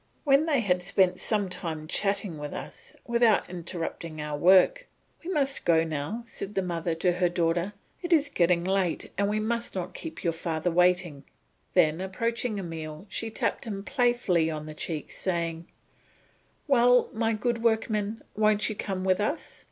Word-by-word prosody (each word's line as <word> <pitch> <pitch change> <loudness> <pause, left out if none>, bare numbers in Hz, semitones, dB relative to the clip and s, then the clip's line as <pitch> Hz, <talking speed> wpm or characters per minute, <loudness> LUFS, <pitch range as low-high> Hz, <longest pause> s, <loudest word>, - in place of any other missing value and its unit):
When 285 +2 +4
they 285 -6 +3
had 180 -4 +1
spent 185 0 +2
some 210 -3 0
time 160 -4 -4
chatting 195 -3 -1
with 150 0 -5
us, - - -9
but - - -25
without 235 -3 +4
interrupting 170 -2 -5
our 150 0 -3
work, 190 - +5 0.4
"We 340 - -6
must 275 -6 0
be - - -11
going 165 -1 +4
now," 155 +10 -3
said 210 -3 -7
the 195 - +1
mother 170 -2 -2
to 175 +2 +2
her 180 0 +1
daughter, 170 +2 0 0.3
"it 350 - -5
is 310 -3 +4
getting 170 -4 +2
late 190 -2 0
and 200 +1 +1
we 215 +1 0
must 235 +1 -1
not 180 -1 -4
keep 160 +1 -8
your 170 - +1
father 165 +1 -2
waiting." 175 -4 +2 0.5
Then 155 +3 +4
approaching 230 +4 -2
Emile 160 -2 -6
she 225 +3 -3
tapped 220 - -2
him 200 -3 -5
playfully 240 - +2
on 155 -1 -4
the 155 - -7
cheek, 155 0 -4
saying, 170 -2 -2 1.0
"Well, 245 -2 +5
my 225 0 +1
good 230 +2 -1
workman, 220 -1 0
won't 210 0 +3
you 215 - -3
come 190 -2 -3
with 185 -1 +2
us?" 250 +10 -3
190 Hz, 175 wpm, -27 LUFS, 170-225 Hz, 1.0 s, work